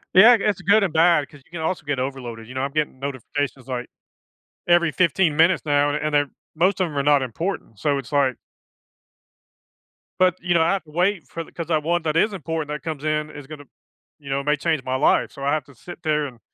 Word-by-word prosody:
Yeah, 215 +6 +9
I 240 - +6
guess, 205 -1 0
good 200 +4 +4
and 190 - 0
bad, 160 -2 +3
'cause 145 - -16
you - - -29
can 175 -2 -6
also 160 -1 -2
get 145 -3 -1
overloaded, 125 -4 -5
you 130 - -11
know, 130 - -1
I'm 140 - -2
getting 150 -3 -2
notifications, 140 0 -4
like, 125 -1 -4 0.8
every 175 -2 +4
15 170 -2 +2
minutes 165 +3 +3
now, 145 -1 +3
an 145 - -1
and 150 0 -2
they're 145 -1 +2 0.3
most 185 +6 +2
of 185 - +2
'em 145 -2 -7
are 140 - +1
not 145 -1 +4
important, 130 - -4
so 140 +3 +1
it's 135 - -7
like 135 -4 +2 1.8
but, 185 -1 +4
you 175 +1 0
know, 170 - +4
I 170 +4 +3
have 195 - -2
to 155 - -18
wait 180 +3 +1
for 165 - -6
th - - -18
'cause 170 -2 -5
that 160 -2 +1
one 170 +3 0
that 155 0 0
is 210 +5 +2
important 160 -3 -3
that 150 0 -5
comes 155 -3 -5
in 155 0 0
is 145 -2 -10
gonna 150 -2 -9 0.6
you 140 - -10
know, 135 0 -1
may 150 +1 +1
change 155 -2 -1
my 130 0 -2
life, 130 - +2
so 140 - -9
I 140 - +2
have 155 -2 0
to 140 +2 -18
sit 175 +7 -12
there 150 -2 +1
and 125 -4 -9
150 Hz, 245 wpm, -23 LUFS, 140-170 Hz, 1.8 s, Yeah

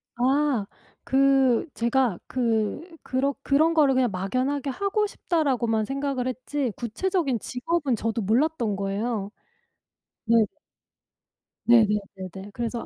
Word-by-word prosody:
아. 260 -2 +1 0.4
그 270 -2 +3
제가 235 -4 +1
그 225 -4 0 0.2
그러 275 +2 0
'그런 310 +4 +3
거를 285 -5 +4
그냥 250 -4 +2
막연하게 255 +9 -1
하고 400 - 0
싶다,'라고만 255 - 0
생각을 270 0 -2
했지 255 0 -2
구체적인 270 - -1
직업은 270 - -1
저도 225 +1 -2
몰랐던 235 +1 +1
거예요. 200 +1 -2 0.9
네. 230 +1 +3 1.3
네네 215 -3 +5 0.3
네네. 195 +2 -9
그래서 235 0 -3
255 Hz, 245 characters per minute, -25 LUFS, 225-280 Hz, 1.3 s, 네네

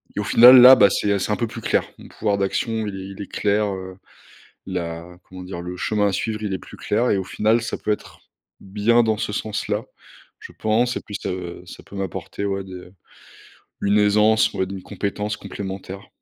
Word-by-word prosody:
et - - -2
au - - -3
final, 125 +4 +9
là, 130 +2 +11
bah 100 -5 +6
c'est, 105 - -1
heu, 100 - +1
c'est 100 - -2
un - - +1
peu 115 - -1
plus 110 - -8
clair. - - +1
Mon - - -13
pouvoir 105 -2 -1
d'action 110 +3 -1
il 100 - -5
est 95 0 -7
il 100 +1 -9
est 100 - -9
clair, 105 +1 +1
heu, 95 -1 -8 0.7
la 85 -1 -5
comment 95 0 -11
dire? 90 -1 -7
Le 90 +1 -6
chemin 105 +2 0
à - - 0
suivre, 110 +3 -3
il 100 -2 -2
est 95 - -3
plus - - -13
clair 115 +4 0
et - - +2
au 95 - -2
final 110 +4 +1
ça 110 0 -4
peut - - -2
être 105 - -5 0.4
bien 105 +5 +2
dans 110 -1 0
ce 105 - -3
sens-là. 105 0 -3 0.6
Je - - -11
pense 115 +3 0
et - - -6
puis 105 - -9
ça, - - -3
heu, 90 -1 -6
ça 90 - -12
peut - - -14
m'apporter, 95 +1 -5
ouais, 100 -1 -2
des, 95 - -11
heu, 90 0 -11 0.9
une 100 +1 +3
aisance, 105 +1 +3
ouais, 95 - -1
d'une 95 0 -7
compétence 105 +2 -4
complémentaire. 95 0 -8
100 Hz, 220 wpm, -22 LUFS, 95-110 Hz, 0.9 s, là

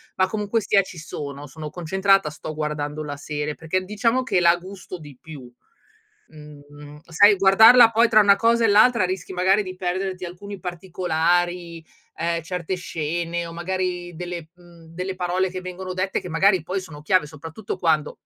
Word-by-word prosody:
ma 185 - +2
comunque 215 +2 -1
sia 200 0 +3
ci 185 -2 -11
sono, 145 -3 -7
sono 155 +2 -8
concentrata, 190 +1 +1
sto 155 +1 -8
guardando 150 0 -4
la 145 -1 -6
serie, 150 +1 -4
perché 175 +4 -2
diciamo 230 +6 0
che 200 -7 +1
la 170 0 +5
gusto 185 +1 -9
di 145 -5 -13
più. 140 -6 -11 0.8
Mhmm, 150 -1 -14
sai 205 +5 +5
guardarla 225 +5 +7
poi 230 +1 +3
tra 215 -1 +5
una 200 -1 +5
cosa 230 0 +2
e - - +4
l'altra 215 +1 +5
rischi 185 0 -4
magari 190 +3 +3
di 185 -1 -8
perderti 185 0 -3
alcuni 195 +3 -8
particolari, 175 -1 -2 0.3
ehm, 170 0 -2
certe 180 +2 -4
scene 170 0 -3
o 165 - -8
magari 175 0 -4
delle, 175 -2 -6
mhmm, 175 -2 -18
delle 180 +3 -6
parole 180 +1 -1
che 185 0 -6
vengono 185 0 -7
dette 185 +1 -2
che 180 - -8
magari 185 +1 +3
poi 185 +4 -3
sono 160 -5 -11
chiave, 170 0 +2
soprattutto 160 +7 -7
quando 160 -4 0
180 Hz, 170 wpm, -23 LUFS, 160-190 Hz, 0.8 s, guardarla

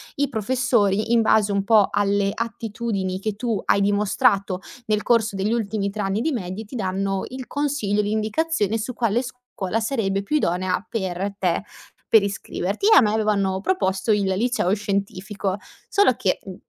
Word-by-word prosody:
i 285 0 +1
professori, 220 -3 +1
in 235 - +5
base 215 -2 +3
un 200 0 +1
po' 215 -2 +5
alle 200 -1 +1
attitudini 225 -4 -3
che 210 +1 -3
tu 230 -1 -2
hai - - +3
dimostrato 200 -1 +1 0.3
nel 210 -1 +1
corso 225 -3 +2
degli 195 +3 0
ultimi 215 -3 -1
3 210 +1 -5
anni 195 +3 -1
di 320 - 0
medie, 195 -2 -4
ti 210 - -10
danno 195 -1 -1
il 260 0 -7
consiglio, 285 -8 0
l'indicazione 220 +3 0
su 230 +3 -4
quale 230 -1 +1
scuola 250 -5 -4
sarebbe 215 -5 0
più 300 +10 +1
idonea 185 - 0
per 190 -2 -3
te, 180 +1 0 0.5
per 220 -3 +6
iscriverti. 200 - -2
A - - +9
me 210 -3 +2
avevano 200 -3 +1
proposto 190 - 0
il 205 - +1
liceo 195 +1 +1
scientifico; 200 -1 -3 0.3
solo 400 -11 +4
che, 190 -5 0
mhmm, 190 -2 -7
205 Hz, 160 wpm, -23 LUFS, 195-230 Hz, 0.5 s, A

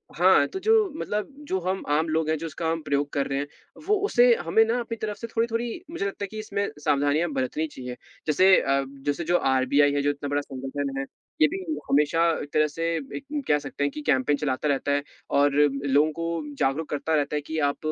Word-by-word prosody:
हाँ, - - +5
तो 380 - -6
जो 440 +3 +3 0.2
मतलब 210 0 -2 0.2
जो 190 - 0
हम 185 +2 -2
आम 155 +3 +2
लोग 160 0 0
हैं, 160 - +1
जो 165 - -6
इसका 160 +1 -4
हम 165 0 -1
प्रयोग 145 -1 0
कर 140 - 0
रहे 135 - -2
हैं, 145 - -3 0.4
वो 425 - +4
उसे 245 - +5
हमें 220 +7 +5
ना 235 +2 0
अपनी 230 -1 -4
तरफ 210 -1 -2
से 230 - -6
थोड़ी-थोड़ी 230 +5 -2
मुझे 265 -12 -3
लगता 200 0 -4
है - - -2
कि 215 - -6
इसमें 200 -2 -2
सावधानियाँ 145 +3 +1
बरतनी 135 +4 -1
चाहिए। 125 -4 -8 0.3
जैसे 185 +5 +6
अ, 135 0 +1 0.2
जैसे 145 +4 -1
जो 175 +2 +2 0.2
आरबीआई 140 +3 +3
है, 145 - +1
जो 145 - +1
इतना 145 0 -3
बड़ा 145 0 +1
संगठन 135 0 -5
है, 135 - -1 0.4
ये 155 - +8
भी 190 +5 -5 0.3
हमेशा 150 +4 +3 0.3
तरह 155 0 +4
से 165 +3 -4 0.3
एक 280 - -10 0.2
कह 150 -1 +3
सकते 145 0 -5
है 145 - +2
कि 150 +2 -7
कैंपेन 135 +2 +2
चलाता 145 0 -1
रहता 140 0 0
है 145 0 +1 0.4
और 145 0 +4 0.3
लोगों 145 +3 +3
को 165 -2 -4
जागरूक 145 +4 0
करता 155 +2 -1
रहता 145 0 0
है 150 - 0
कि 160 +2 -5
आप 140 - -4
150 Hz, 220 wpm, -25 LUFS, 145-185 Hz, 0.4 s, ये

